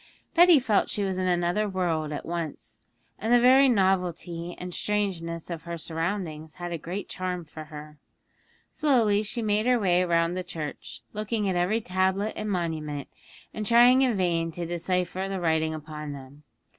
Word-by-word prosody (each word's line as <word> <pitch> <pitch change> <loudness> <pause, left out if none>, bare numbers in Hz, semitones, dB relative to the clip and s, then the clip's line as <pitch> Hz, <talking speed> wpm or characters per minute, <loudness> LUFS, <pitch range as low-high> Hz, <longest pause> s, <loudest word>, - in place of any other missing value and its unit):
Betty 350 -1 +7
felt 225 -6 +1
she 205 - -1
was 190 -1 -1
in 185 - 0
another 180 +4 +1
world 165 -5 -1
at 150 - -5
once, 165 -9 -5 0.4
and 220 +3 -2
the 245 - +7
very 260 +3 +6
novelty 180 -4 0
and 180 0 -7
strangeness 175 -6 -2
of 165 -2 -4
her 170 0 -6
surroundings 165 -1 -4
had 175 -1 -6
a 170 - -3
great 185 +6 -5
charm 180 -2 -4
for 155 0 -9
her. 150 -1 -11 0.7
Slowly 235 -9 +3
she 225 +2 -3
made 215 +2 +1
her 250 -1 +4
way 180 -3 +3
round 170 0 +1
the 185 - -3
church, 160 -4 -7
looking 215 0 -2
at 190 - 0
every 185 +6 +1
tablet 190 +2 0
and 215 0 -4
monument, 155 -6 -3 0.4
and 215 - -4
trying 240 +4 +6
in 250 -6 +2
vain 170 -3 +1
to 175 +1 -4
decipher 180 +2 -2
the 195 -1 -3
writing 160 -2 +1
upon 150 -1 -7
them. 140 +1 -12
180 Hz, 170 wpm, -27 LUFS, 165-210 Hz, 0.7 s, Betty